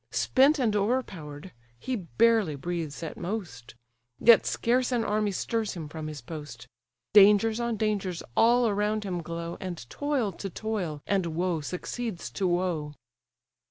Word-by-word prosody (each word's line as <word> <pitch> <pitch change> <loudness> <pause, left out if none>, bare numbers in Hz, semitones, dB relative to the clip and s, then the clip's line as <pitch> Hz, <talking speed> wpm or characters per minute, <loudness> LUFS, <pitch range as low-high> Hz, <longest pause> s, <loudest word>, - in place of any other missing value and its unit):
Spent 275 +4 +3
and 230 -6 +1
o'erpower'd, 190 - -2 0.3
he 255 - -3
barely 220 -3 +2
breathes 165 +1 -4
at 160 - -6
most; 170 - -6 0.4
Yet 235 -1 +6
scarce 250 +2 +1
an 240 -2 +1
army 210 0 0
stirs 215 +2 -2
him 160 -3 -6
from 155 0 -6
his 150 -2 -7
post; 145 -3 -9 0.5
Dangers 210 +2 +6
on 235 -2 -1
dangers 200 -5 -1
all 240 +1 +5
around 210 +1 0
him 180 -3 -3
glow, 170 +1 -5
And 175 -10 -6
toil 285 -8 -1
to 195 +2 -6
toil, 180 -7 -4
and 195 -3 +1
woe 175 -2 0
succeeds 185 +5 -5
to 195 - -1
woe. 175 -4 -1
195 Hz, 145 wpm, -28 LUFS, 165-225 Hz, 0.5 s, Yet